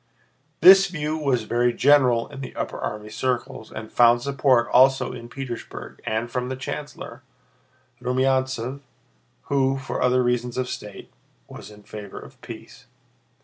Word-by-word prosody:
This 195 Hz, +1 st, +9 dB
view 155 Hz, -4 st, -3 dB
was 135 Hz, -7 st, 0 dB
very 120 Hz, +2 st, +1 dB
general 125 Hz, -3 st, +4 dB
in 140 Hz, -1 st, -9 dB
the 130 Hz, -, -8 dB
upper -, -, -4 dB
army 105 Hz, 0 st, -5 dB
circles 120 Hz, -1 st, -3 dB
and 110 Hz, 0 st, -8 dB
found 120 Hz, 0 st, +4 dB
support 135 Hz, -3 st, +2 dB
also 130 Hz, 0 st, +4 dB
in 120 Hz, -1 st, -9 dB
Petersburg 130 Hz, -3 st, -8 dB
and 110 Hz, +2 st, -2 dB
from 125 Hz, 0 st, -2 dB
the 130 Hz, -, -3 dB
chancellor, 135 Hz, -2 st, -7 dB, 0.8 s
Rumyántsev, 130 Hz, 0 st, 0 dB, 0.6 s
who, 135 Hz, -1 st, +1 dB
for 135 Hz, 0 st, -5 dB
other 125 Hz, 0 st, +3 dB
reasons 125 Hz, 0 st, -1 dB
of 130 Hz, -1 st, -1 dB
state, 105 Hz, -4 st, -8 dB, 0.4 s
was -, -, -11 dB
in 105 Hz, 0 st, -15 dB
favor 105 Hz, -1 st, -9 dB
of -, -, -15 dB
peace. -, -, -11 dB
125 Hz, 145 wpm, -23 LUFS, 120-135 Hz, 0.8 s, This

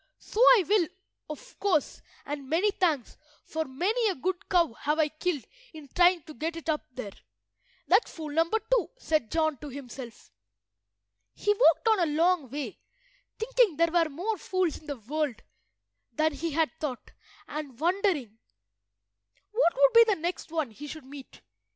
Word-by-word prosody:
"So 430 Hz, -, -7 dB
I -, -, +8 dB
will, 405 Hz, -5 st, +3 dB, 0.4 s
of 405 Hz, +12 st, -10 dB
course, 365 Hz, -8 st, 0 dB, 0.2 s
and 280 Hz, -2 st, -6 dB
many 365 Hz, +6 st, +2 dB
thanks, 320 Hz, -, -1 dB, 0.3 s
for 320 Hz, 0 st, -3 dB
many 400 Hz, -, 0 dB
a 380 Hz, -, -1 dB
good 360 Hz, +6 st, -3 dB
cow 340 Hz, -8 st, +3 dB
have 300 Hz, +6 st, -1 dB
I 310 Hz, -1 st, +2 dB
killed 310 Hz, -3 st, -2 dB, 0.3 s
in 305 Hz, -3 st, -11 dB
trying 355 Hz, 0 st, +4 dB
to 310 Hz, -, -11 dB
get 325 Hz, +3 st, -3 dB
it 330 Hz, -1 st, -6 dB
up 305 Hz, -1 st, 0 dB
there." 215 Hz, -6 st, -6 dB, 0.7 s
"That's 395 Hz, +6 st, +3 dB
fool 310 Hz, -3 st, -7 dB
number 330 Hz, +7 st, +2 dB, 0.2 s
two," -, -, +2 dB
said 310 Hz, -, 0 dB
John 315 Hz, -3 st, +1 dB
to 295 Hz, -, -8 dB
himself. 255 Hz, -3 st, -10 dB, 1.0 s
He 415 Hz, -, +2 dB
walked 455 Hz, +1 st, +4 dB
on 440 Hz, -3 st, +4 dB
a 335 Hz, -4 st, +1 dB
long 335 Hz, -4 st, +2 dB
way, 285 Hz, +2 st, -5 dB, 0.6 s
thinking 450 Hz, -6 st, +2 dB
there 335 Hz, 0 st, +3 dB
were 335 Hz, -2 st, +2 dB
more 365 Hz, +8 st, -3 dB
fools 370 Hz, -3 st, -1 dB
in 310 Hz, -, -19 dB
the 285 Hz, -2 st, -4 dB
world 275 Hz, +2 st, -3 dB, 0.7 s
than 315 Hz, 0 st, +1 dB
he 330 Hz, +4 st, -3 dB
had 315 Hz, +1 st, +1 dB
thought, 265 Hz, -6 st, -5 dB, 0.4 s
and 290 Hz, -5 st, -6 dB
wondering 330 Hz, -, 0 dB, 1.1 s
what 430 Hz, -6 st, +3 dB
would -, -, +5 dB
be 465 Hz, 0 st, +9 dB
the 425 Hz, -6 st, +1 dB
next 345 Hz, 0 st, -4 dB
one 315 Hz, -7 st, -1 dB
he 290 Hz, +7 st, -9 dB
should 300 Hz, -1 st, -8 dB
meet. 275 Hz, 0 st, -12 dB
320 Hz, 165 wpm, -28 LUFS, 290-370 Hz, 1.1 s, be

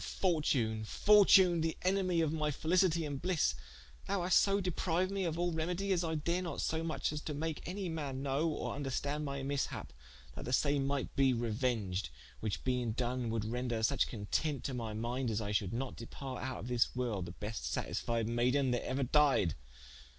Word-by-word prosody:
fortune, 135 Hz, -, 0 dB
fortune, 190 Hz, -, +6 dB
the 160 Hz, 0 st, -1 dB
enemy 185 Hz, -2 st, +2 dB
of 160 Hz, -1 st, +1 dB
my 155 Hz, -1 st, 0 dB
felicitie 170 Hz, +2 st, +2 dB
and 140 Hz, -2 st, -4 dB
blisse, 180 Hz, -, +2 dB, 0.5 s
thou 200 Hz, -3 st, 0 dB
haste 180 Hz, +1 st, +5 dB
so 200 Hz, 0 st, +2 dB
depriued 180 Hz, 0 st, 0 dB
me 195 Hz, -1 st, -1 dB
of 165 Hz, -1 st, -2 dB
all 175 Hz, 0 st, +1 dB
remedie, 175 Hz, +5 st, -1 dB
as 180 Hz, -2 st, +2 dB
I 160 Hz, -1 st, -1 dB
dare 170 Hz, +4 st, 0 dB
not 175 Hz, -2 st, -4 dB
so 160 Hz, 0 st, -1 dB
muche 160 Hz, -2 st, -1 dB
as 150 Hz, -, -3 dB
to 150 Hz, -, -4 dB
make 160 Hz, +1 st, -3 dB
any 190 Hz, +1 st, -3 dB
man 145 Hz, -5 st, -4 dB
know 140 Hz, +4 st, +1 dB
or 155 Hz, -, -3 dB
vnderstand 145 Hz, +1 st, -2 dB
my 140 Hz, -1 st, -3 dB
mishap 140 Hz, 0 st, -3 dB, 0.4 s
that -, -, -6 dB
the 125 Hz, -, -3 dB
same 140 Hz, 0 st, +2 dB
might 140 Hz, -1 st, -2 dB
be 135 Hz, -2 st, +4 dB
reuenged, 110 Hz, -, -1 dB, 0.3 s
which 110 Hz, -2 st, -3 dB
being 125 Hz, -3 st, 0 dB
doen 125 Hz, 0 st, -1 dB
would 110 Hz, -1 st, -1 dB
render 120 Hz, 0 st, -2 dB
such 140 Hz, +4 st, +2 dB
content 125 Hz, +6 st, -2 dB
to 135 Hz, -, -3 dB
my 115 Hz, -3 st, -4 dB
minde, 120 Hz, +3 st, -2 dB
that 110 Hz, -1 st, 0 dB
I 105 Hz, -1 st, -3 dB
should 105 Hz, -2 st, +1 dB, 0.3 s
departe 130 Hz, +2 st, -7 dB
out 130 Hz, -1 st, -3 dB
of -, -, -7 dB
this 125 Hz, -1 st, +3 dB
worlde 115 Hz, -8 st, -1 dB
the -, -, -6 dB
beste 105 Hz, +3 st, -5 dB
satisfied 115 Hz, -1 st, -1 dB
mayden 125 Hz, +3 st, +2 dB
that 120 Hz, -, 0 dB
euer 135 Hz, +1 st, -1 dB
died. 140 Hz, -, +4 dB
140 Hz, 190 wpm, -34 LUFS, 120-165 Hz, 0.5 s, fortune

